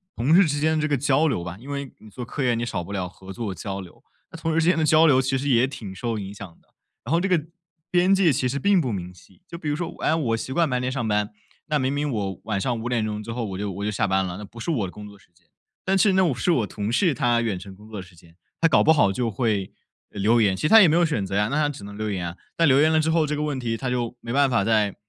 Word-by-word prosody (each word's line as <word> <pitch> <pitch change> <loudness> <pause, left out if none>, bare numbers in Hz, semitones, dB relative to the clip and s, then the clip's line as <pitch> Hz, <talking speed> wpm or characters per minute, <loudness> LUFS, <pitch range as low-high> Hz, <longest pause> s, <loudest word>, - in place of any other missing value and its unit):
同 140 +8 +3
事 195 - +7
之 145 -1 -1
间 155 +1 +1
这 150 - 0
个 145 - +2
交 145 +4 +2
流 130 - -1
吧 90 +1 -6
因 130 +5 -12
为 140 -2 -4
你 110 - -15
做 120 +4 -7
科 135 +3 -4
研 120 -2 +2
你 120 - -2
少 100 -7 -3
不 100 - -10
了 95 -2 -2
合 95 +2 -12
作 110 -3 -4
交 95 +3 -5
流， 90 -2 -12 0.3
那 165 - -9
同 160 0 -2
事 160 - +2
之 160 - +1
间 180 - +4
的 160 - +1
交 155 +1 +5
流 130 -3 +5
其 135 0 0
实 140 - -3
也 120 0 +4
挺 110 -8 -8
受 115 +2 -3
影 100 0 -7
响 100 -1 -8
的。 - - -35 0.4
然 135 - -5
后 170 - +3
这 195 - -1
个 165 -5 +1 0.5
边 180 +2 +4
界 185 -6 +3
其 130 0 0
实 140 - -2
并 195 +3 +3
不 125 -5 -2
明 90 -2 -5
晰， 95 - -21
就 170 - -8
比 155 -3 -4
如 145 - 0
说， 170 +1 -3
我 - - -13
哎， - - +3
我 120 -8 0
习 130 - -6
惯 165 +4 +2
白 125 -1 0
天 130 +1 -2
上 125 -4 -2
班， 105 0 0 0.4
那 150 - +1
明 130 +2 0
明 145 0 -1
我 100 -4 -3
晚 105 -3 -1
上 120 +3 -1
5 120 - -4
点 115 -3 0
钟 105 0 -4
之 115 - -6
后 115 0 -3
我 95 -3 -5
就 100 0 -3
我 100 +3 -5
就 105 - -1
下 110 +2 0
班 95 0 +1
了， 90 -1 -5
那 105 - -8
不 115 +4 -14
是 115 - -4
我 110 - -1
的 - - -9
工 105 0 -10
作 100 -1 -14
时 90 - -26
间。 - - -32 0.4
但 190 - +2
其 190 - +4
实 - - +2
那 190 0 +4
我 145 -8 0
是 175 - 0
我 120 - +1
同 105 +1 -4
事 170 +5 +2
他 120 -4 +1
远 110 -5 -1
程 95 +1 -10
工 105 +3 -16
作 110 - -8
的 - - -10
时 90 - -19
间， 85 0 -20 0.2
他 165 - +4
搞 - - +4
不 160 - +5
好 120 -11 +4
就 115 +3 -1
会， 105 -3 -1 0.4
呃 105 - -8
留 115 +4 +3
言， 100 -3 +3
其 - - -7
实 150 - +2
他 225 +2 +9
也 180 - +7
没 155 - +3
有 175 0 +4
选 135 -11 -1
择 95 +1 -4
呀， 105 +2 +1
那 145 - -2
他 150 -1 +2
只 140 -8 -8
能 100 0 -9
留 110 +1 -3
言 90 -4 -3
啊。 85 - -11 0.2
但 165 -1 +3
留 135 +1 +5
言 155 +1 +4
了 160 - +3
之 160 +1 +1
后， 160 -2 +2
这 150 - -1
个 150 - -2
问 145 -3 -2
题 115 -2 -2
它 125 +1 -3
就 120 -1 -2
没 115 - -5
办 140 0 +3
法 115 -5 +2
在 105 -2 +1
120 Hz, 355 characters per minute, -24 LUFS, 105-150 Hz, 0.5 s, 他